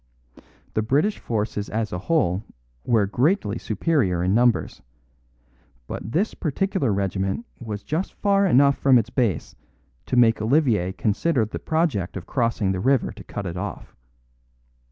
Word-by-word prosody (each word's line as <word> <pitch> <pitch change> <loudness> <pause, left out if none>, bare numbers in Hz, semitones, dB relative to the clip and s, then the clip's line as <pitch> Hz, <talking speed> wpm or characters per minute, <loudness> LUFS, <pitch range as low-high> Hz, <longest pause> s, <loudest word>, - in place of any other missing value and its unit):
The 110 - +1
British 145 - +1
forces 105 -2 -3
as 110 0 -2
a 90 - -2
whole 100 - +1 0.4
were 110 -4 +2
greatly 120 - 0
superior 105 - 0
in 90 +2 +1
numbers; 120 +1 +2 1.0
but 105 - -6
this 200 +7 +1
particular 160 - -1
regiment 95 +2 -1
was 105 -4 -6
just 160 - -3
far 200 -1 +2
enough 140 -2 +4
from 135 -2 +5
its 115 +1 -1
base 115 - -1 0.5
to - - -1
make 115 -2 +4
Olivier 110 - +2
consider 110 - +1
the 110 - -6
project 155 - -1
of 90 - -7
crossing 115 -6 0
the 95 - -2
river 130 +5 +2
to 100 -1 -12
cut 100 - -6
it 90 -1 -4
off. 100 +2 -6
115 Hz, 145 wpm, -23 LUFS, 100-140 Hz, 1.0 s, from